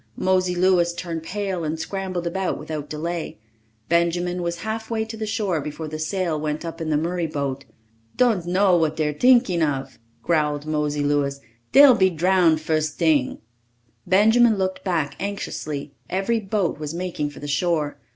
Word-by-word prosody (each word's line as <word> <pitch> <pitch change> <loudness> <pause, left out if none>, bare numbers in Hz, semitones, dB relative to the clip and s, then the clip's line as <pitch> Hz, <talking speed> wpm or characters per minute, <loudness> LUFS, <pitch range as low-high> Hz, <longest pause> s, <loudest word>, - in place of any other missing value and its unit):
Mosey 185 -1 +1
Louis 175 -1 +3
turned 170 -2 -4
pale 190 0 -3
and 160 +1 -3
scrambled 185 -1 -4
about 185 +2 -1
without 150 -2 -6
delay. 165 -3 -4 0.5
Benjamin 175 +1 +1
was 170 0 -3
halfway 220 +1 -3
to 225 0 -7
the 220 -1 -4
shore 205 -7 -1
before 150 +2 -6
the 155 0 -6
sail 165 -1 -1
went 150 +2 -3
up 165 0 -6
in 160 - -2
the 150 - +2
Murray 170 +2 -1
boat. 140 -2 -3 0.5
"Don' 235 -7 +3
know 190 0 +4
what 160 -2 +1
dey're 150 -1 0
tinkin' 240 - +4
of," 135 -4 -2 0.2
growled 150 -3 0
Mosey 150 -1 -1
Louis. 145 -1 0 0.3
"Dey'll 280 -1 +9
be 190 -4 +4
drown 175 -1 +3
fust 155 0 -1
ting!" 155 -6 +1 0.7
Benjamin 220 +4 +5
looked 190 -1 -2
back 165 -7 -1
anxiously. 155 -8 -4 0.2
Every 195 +5 0
boat 195 -6 -1
was 150 +1 -5
making 170 -4 -3
for 145 - -12
the 145 - -7
shore. 150 0 0
170 Hz, 160 wpm, -23 LUFS, 155-190 Hz, 0.7 s, Dey'll